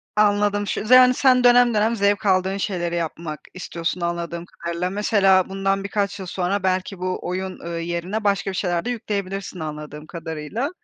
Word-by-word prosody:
Anladım, 205 -1 +2
ş - - -2
yani 255 0 +8
sen 255 -1 +4
dönem 245 -1 +6
dönem 220 +2 +2
zevk 200 0 +1
aldığın 190 0 +2
şeyleri 175 -4 -2
yapmak 165 -2 -4
istiyorsun 175 -1 -4
anladığım 170 0 -3
kadarıyla. 170 +1 -4
Mesela 195 -2 +3
bundan 195 0 -1
birkaç 200 0 -2
yıl 190 - -5
sonra 185 +2 -2
belki 185 0 -1
bu 185 0 -2
oyun, 185 +1 -4
eee, 170 - -4
yerine 175 +5 -3
başka 200 -1 +1
bir - - -6
şeyler 175 -1 -1
de - - -2
yükleyebilirsin 200 -5 -4
anladığım 150 0 -7
kadarıyla. 165 - -4
190 Hz, 165 wpm, -22 LUFS, 170-205 Hz, -, yani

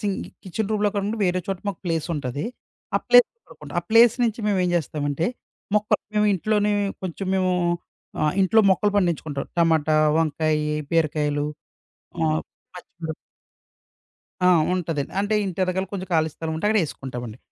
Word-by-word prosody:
Sink 200 -3 -1 0.3
kitchen 200 +3 -2
రూమ్‌‌లో 210 -1 +2
కాకుండా 205 +2 -1
వేరే 180 0 +1
చోట 195 -2 -2
మాకు 190 - -4
ప్లేసుంటాది. 155 -5 -2 0.5
ఆ - - +3
ప్లేస్‌లో 245 - +6
కడుక్కుంటాం. - - -10
ఆ - - -20
ప్లేస్ 230 0 +7
నుంచి 230 0 -1
మేమేం 185 -3 +2
జేస్తామంటే, 150 -1 -1 0.5
మొక్కల్ 210 0 +1 0.2
మేమింట్లోనే 210 +1 +2 0.3
కొంచెం 185 +1 -4
మేము 185 -1 +2 0.7
ఆహ్, 150 - +2
ఇంట్లో 220 +4 +5
మొక్కలు 205 +2 +2
పండించుకుంటాం. 160 -6 0
టమాటా, 160 -2 +3 0.2
వంకాయి, 155 -1 +1 0.2
బీరకాయలు, 150 -2 +1 0.8
ఆహ్, 155 -1 +1 0.3
పచ్చిమిరప్ 165 -3 -7 1.3
ఆ! - - +7 0.3
ఉంటదండి. 160 -6 -2
అంటే 210 +1 0
ఇంటెనకాల 185 +1 -1
కొంచెం 190 -1 -4
ఖాళీ 160 0 +3
స్థలం 160 -1 -4
ఉంటే 185 - -1
అక్కడేసుకుంటామండి. 130 - -2
175 Hz, 130 wpm, -23 LUFS, 155-205 Hz, 1.3 s, ప్లేస్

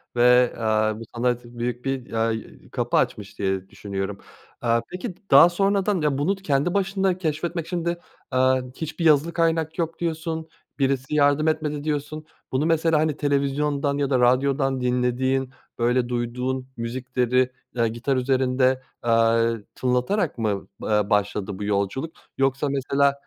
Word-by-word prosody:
ve, 125 0 +5
aaa, 110 -1 +1
bu - - -7
sana 120 0 +1
t 120 0 -15
büyük 120 +1 -3
bir, 135 -3 -3
aaa, 115 0 +1
y 110 0 -8
kapı - - 0
açmış 100 -1 -1
diye 95 -1 -1
düşünüyorum. 100 0 -4 0.4
Aaa, 115 -1 +2
peki 180 +3 -5
d - - -28
daha 140 +6 +9
sonradan 195 +1 +1
ya 150 -3 +1
bunu 170 +8 +1
kendi 170 -3 0
başına 195 -1 +1
keşfetmek 165 0 -2
şimdi, 170 -1 -2 0.3
aaa, 130 0 +3
hiçbir 160 +2 -4
yazılı 155 +2 +4
kaynak 165 -1 0
yok, 165 -1 -2
diyorsun. 160 -1 -3 0.3
Birisi 135 +1 0
yardım 145 +1 +3
etmedi, 150 -2 -1
diyorsun. 155 0 -3 0.3
Bunu 135 +4 +1
mesela 165 -1 +3
hani 155 -2 0
televizyondan 140 0 0
ya 145 -1 0
da 130 - +2
radyodan 135 +1 +2
dinlediğin, 125 +1 0 0.3
böyle, 120 +1 +2
duyduğun 125 +2 -2
müzikleri, 125 +1 0 0.3
ııı, 115 -1 +3
gitar 120 +4 -1
üzerinde, 130 0 +2 0.2
aaa, 115 0 +3 0.2
tınlatarak 130 - 0
mı, 105 -4 -2
aaa, 105 -1 +1
başladı 105 -1 0
bu - - -4
yolculuk 100 +10 -1 0.2
yoksa 135 +1 +1
mesela 140 +1 +2
135 Hz, 145 wpm, -24 LUFS, 120-155 Hz, 0.4 s, daha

